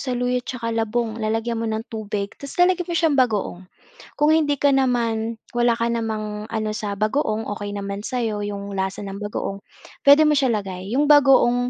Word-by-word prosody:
saluyot, 250 -1 -1
'tsaka 235 -3 -4
labong, 225 0 -1
lalagyan 225 +1 -1
mo 230 - -2
ng 220 0 -2
tubig, 210 -2 -4
tas 280 - -8
lalagyan 360 -1 +2
mo 345 - -3
siyang 320 -3 +2
bagoong. 210 -7 0 0.5
Kung 295 +1 +4
hindi 290 -3 +2
ka 285 +1 +3
naman 230 -4 0 0.2
wala 240 -1 +2
ka 230 0 0
namang 215 -2 -3
ano 215 -1 -2
sa 205 -2 -4
bagoong 215 0 0
okey 205 0 -5
naman 200 0 -4
sayo 225 -3 -2
yung 200 -1 -5
lasa 190 +1 -3
ng 195 +1 -7
bagoong, 200 -1 -4 0.5
pwede 305 +2 +8
mo 300 - +4
siya 270 -3 +2
lagay, 195 -3 -4
yung 290 +2 +3
bagoong. 265 -4 +5
225 Hz, 180 wpm, -22 LUFS, 210-255 Hz, 0.5 s, pwede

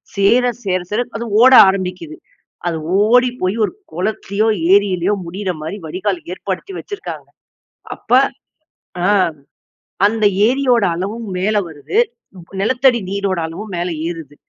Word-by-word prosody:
சேர 215 +5 +3 0.2
சேர 185 -2 0
சேர, 215 +3 +1 0.2
அது 235 - -5 0.2
ஓட 260 +2 +7 0.2
ஆரம்பிக்குது. 180 -5 -4 0.5
அது 165 -2 -1 0.3
ஓடி 250 +2 +4
போய் 185 +2 0
ஒரு - - -7 0.2
குளத்துலையோ, 200 +3 -1 0.3
ஏரிலயோ, 195 -1 +2
முடியிற 185 +3 -3
மாரி 160 +6 -5
வடிகால் 185 +3 -2
ஏற்படுத்தி 190 - -5
வச்சிருக்காங்க. 410 0 -8 0.7
அப்ப - - -8 0.9
அ, - - +2 1.0
அந்த 215 +1 +1 0.2
ஏரியோட 250 -2 +2
அளவும் 210 +6 -4
மேல 205 +4 0
வருது, 160 - -5 0.4
ப்ப 175 +2 -13
நிலத்தடி 250 +3 +3
நீரோட 200 -2 -1
அளவும் 200 +6 -8
மேல 175 +1 -2 0.2
ஏறுது. 165 -4 -7
200 Hz, 125 wpm, -17 LUFS, 180-225 Hz, 1.0 s, ஓட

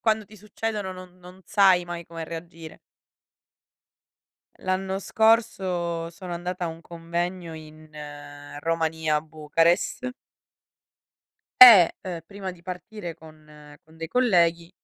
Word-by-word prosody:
quando 220 -1 +1
ti 215 +2 -16
succedono 210 -1 -4
non 185 0 -12
non 180 +1 -14
sai 190 -3 +4
mai 175 -1 -7
come 165 -1 -7
reagire. 165 -1 -9 1.8
L'anno 190 +1 -2
scorso 185 -7 +1
sono 180 +1 -9
andata 175 +1 -4
a - - -3
un 165 0 -8
convegno 170 +1 -5
in 155 0 -13 0.7
Romania, 160 -1 0
a 150 - 0
Bucarest 165 +10 0 1.5
e, 215 -9 +11
uhm, 175 -3 -5
prima 195 -1 -7
di 175 -2 -15
partire 180 0 -7
con 150 -2 -16
con 160 +1 -20
dei 165 0 -6
colleghi 170 -7 +2
175 Hz, 115 wpm, -25 LUFS, 165-190 Hz, 1.8 s, e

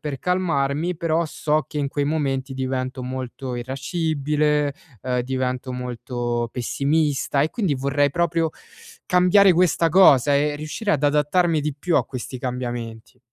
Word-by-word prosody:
per 145 -4 -4
calmarmi, 170 -2 0
però 165 +1 0
so 155 0 -1
che 150 - -5
in 140 -1 0
quei 145 +1 -1
momenti 140 -3 -1
divento 130 0 -3
molto 130 0 -5
irascibile, 150 +2 -1 0.3
uhm, 125 -1 0
divento 130 0 -3
molto 120 -1 -3
pessimista 140 +3 0
e 155 - +1
quindi 195 -11 0
vorrei 140 +2 +1
proprio 165 0 0 0.6
cambiare 180 +2 +5
questa 170 -1 +3
cosa 145 -6 +6
e 145 +1 +1
riuscire 155 +8 -3
ad 145 - 0
adattarmi 150 +3 +2
di 150 -2 -2
più 170 +4 0
a - - +3
questi 130 0 -7
cambiamenti. 120 -2 -5
145 Hz, 140 wpm, -22 LUFS, 130-160 Hz, 0.6 s, cosa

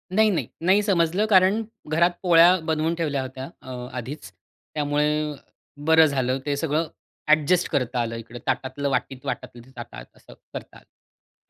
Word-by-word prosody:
नाही, 220 +1 +5
नाही. 185 - -1
नाही, 190 +4 +4
समजलं 185 0 +2
कारण 195 +2 +4 0.3
घरात 170 +3 +4
पोळ्या 175 0 +7
बनवून 160 +1 0
ठेवल्या 150 -5 -1
होत्या 130 +1 -7
अ, 130 - -10 0.3
आधीच. 125 -4 -7 0.4
त्यामुळे 150 0 0 0.5
बरं 160 0 +7
झालं, 130 -3 0
ते 145 - 0
सगळं 155 +1 0 0.4
ॲडजस्ट 155 +4 +3
करता 125 -2 -1
आलं. 115 0 -3
इकडे 115 +1 -9
ताटातलं 140 +2 -1
वाटीत, 130 -1 -3
वाटातलं 120 - -5
ते 130 - -19
ताटात, 120 - -8
असं - - -16 0.2
करता - - -8
आलं. - - -29
150 Hz, 150 wpm, -24 LUFS, 130-170 Hz, 0.5 s, पोळ्या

